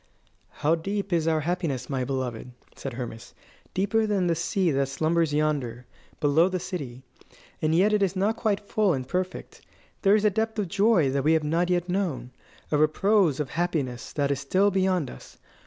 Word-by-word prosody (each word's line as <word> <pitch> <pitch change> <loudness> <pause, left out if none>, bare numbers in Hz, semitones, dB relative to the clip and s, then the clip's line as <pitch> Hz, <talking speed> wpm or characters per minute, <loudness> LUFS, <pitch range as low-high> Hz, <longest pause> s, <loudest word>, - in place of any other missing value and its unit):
"How 150 +2 0
deep 195 +3 -2
is 165 -1 +1
our 160 -1 +2
happiness, 150 -6 -2
my 135 -2 -2
beloved!" 125 -2 -3 0.3
said 135 - -6
Hermas; 120 -2 -7 0.4
"deeper 210 +3 +1
than 200 -3 +1
the 170 - +2
sea 170 +2 0
that 135 -1 +1
slumbers 160 +3 +1
yonder, 140 -6 -1 0.3
below 155 +5 +3
the 185 -1 -2
city. 145 -9 -6 0.6
And 155 +1 +2
yet 200 +5 +4
it 210 - +2
is 195 -1 +1
not 200 +4 +1
quite 215 -3 0
full 205 -4 +2
and 130 -3 -4
perfect. 185 +4 -4 0.4
There 200 0 +5
is 215 0 +1
a 210 - +4
depth 220 +2 -1
of 200 -4 -1
joy 195 -8 +3
that 140 0 0
we 155 +3 +4
have 160 -1 +2
not 165 +4 0
yet 180 -1 +1
known 170 -10 -2 0.4
a 150 - +2
repose 160 +1 +3
of 150 - -3
happiness 155 -8 -2
that 140 -1 0
is 140 - -1
still 190 +9 +2
beyond 185 -7 +1
us. - - -13
165 Hz, 190 wpm, -26 LUFS, 140-195 Hz, 0.6 s, There